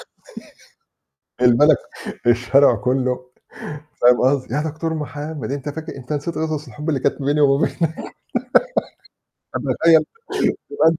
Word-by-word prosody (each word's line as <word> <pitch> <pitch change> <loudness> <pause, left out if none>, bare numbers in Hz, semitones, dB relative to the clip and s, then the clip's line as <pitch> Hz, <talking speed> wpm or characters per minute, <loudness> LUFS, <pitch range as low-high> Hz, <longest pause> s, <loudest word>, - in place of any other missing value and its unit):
قصدي؟ - - -14 1.4
البلد 125 +5 +6 0.5
ك - - -1
الشارع 130 +4 +5
كله 125 0 -1 0.8
فاهم 125 0 +5
قصدي؟ 130 -1 +1
"يا 150 - +1
دكتور 160 +1 -3
محمد، 150 -4 -5
أنت 140 +1 -4
فاكر 160 +2 -7
أنت 130 +3 -6
نسيت 150 +3 -3
قصص 155 -2 -2
الحب 150 +7 -6
اللي 145 -4 +1
كانت - - 0
ما - - -4
بيني 150 +1 +2
وما 140 +1 +4
بينك." - - -5 1.8
فتخيّل 160 -1 +3 0.7
تبقى 425 - +4
أنت 165 -1 +1
145 Hz, 135 wpm, -20 LUFS, 130-155 Hz, 1.8 s, البلد